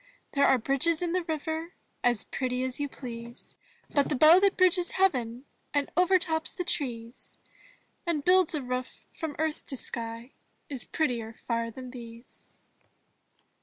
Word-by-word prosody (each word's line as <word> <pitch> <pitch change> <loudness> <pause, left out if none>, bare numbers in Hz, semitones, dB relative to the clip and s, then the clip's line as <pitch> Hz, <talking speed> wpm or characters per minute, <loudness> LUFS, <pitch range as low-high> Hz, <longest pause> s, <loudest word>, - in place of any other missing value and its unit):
There 280 0 +4
are 265 - +5
bridges 275 +8 +1
in 345 - 0
the 365 +1 +1
river 320 +2 -3 0.3
As 240 -3 +2
pretty 255 -1 -2
as 260 +1 -1
you 285 -1 -1
please. 235 -3 -9 0.4
But 285 -1 +3
the - - +1
bow 315 +6 +8
that 395 0 +3
bridges 360 -1 +3
heaven 255 -10 +1 0.3
And 285 -1 +1
overtops 355 -3 +2
the 360 - -2
trees. 240 -8 -4 0.7
And 305 -4 0
builds 365 -2 +5
a 290 - -2
roof 250 0 -4
from 315 -3 -4
earth 315 0 -1
to 270 - -3
sky 230 +1 -4 0.4
Is 270 -4 -2
prettier 235 -8 -1
far 230 0 -2
than 255 +2 -9
these. 235 -1 -11
280 Hz, 150 wpm, -29 LUFS, 240-330 Hz, 0.7 s, bow